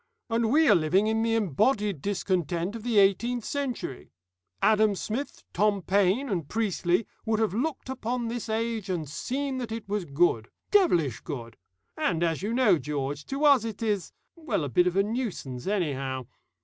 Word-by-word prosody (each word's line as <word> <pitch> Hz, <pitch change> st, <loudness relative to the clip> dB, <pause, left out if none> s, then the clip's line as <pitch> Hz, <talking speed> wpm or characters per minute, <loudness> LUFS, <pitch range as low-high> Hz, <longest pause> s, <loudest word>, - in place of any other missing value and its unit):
And 230 Hz, 0 st, +1 dB
we 315 Hz, +2 st, +5 dB
are -, -, +7 dB
living 170 Hz, +5 st, +3 dB
in 220 Hz, +1 st, +1 dB
the 225 Hz, 0 st, +1 dB
embodied 205 Hz, -, +1 dB
discontent 185 Hz, -1 st, -1 dB
of 230 Hz, -, -6 dB
the 230 Hz, -1 st, 0 dB
eighteenth 210 Hz, +4 st, +3 dB
century. 260 Hz, -, -4 dB, 0.5 s
Adam 215 Hz, -, +4 dB
Smith, 235 Hz, +9 st, -4 dB
Tom 205 Hz, -2 st, +2 dB
Paine, 200 Hz, +8 st, +2 dB
and 175 Hz, -, -2 dB
Priestley 205 Hz, -3 st, 0 dB, 0.2 s
would 220 Hz, -1 st, 0 dB
have 220 Hz, -5 st, +1 dB
looked 270 Hz, +6 st, -2 dB
upon 250 Hz, -2 st, -3 dB
this 235 Hz, -1 st, -4 dB
age 220 Hz, -2 st, -2 dB
and 170 Hz, -5 st, -2 dB
seen 260 Hz, -, -3 dB
that 240 Hz, -3 st, -5 dB
it 225 Hz, -2 st, -5 dB
was 205 Hz, -2 st, -2 dB
good 140 Hz, -6 st, +1 dB, 0.2 s
devilish 175 Hz, -, +3 dB
good; 115 Hz, -7 st, -7 dB, 0.4 s
and 170 Hz, -1 st, 0 dB
as 165 Hz, -1 st, 0 dB
you 210 Hz, +3 st, -2 dB
know, 230 Hz, -9 st, +4 dB
George, 145 Hz, +1 st, -3 dB
to 275 Hz, +2 st, -1 dB
us 280 Hz, -6 st, +6 dB
it 225 Hz, -1 st, -5 dB
is 205 Hz, -6 st, -1 dB, 0.2 s
well, 290 Hz, -, -2 dB
a 145 Hz, -, -3 dB
bit 180 Hz, +9 st, +3 dB
of 180 Hz, -, 0 dB
a 195 Hz, -, +4 dB
nuisance 200 Hz, -, -4 dB
anyhow. 135 Hz, -10 st, -1 dB
205 Hz, 175 wpm, -27 LUFS, 170-230 Hz, 0.5 s, are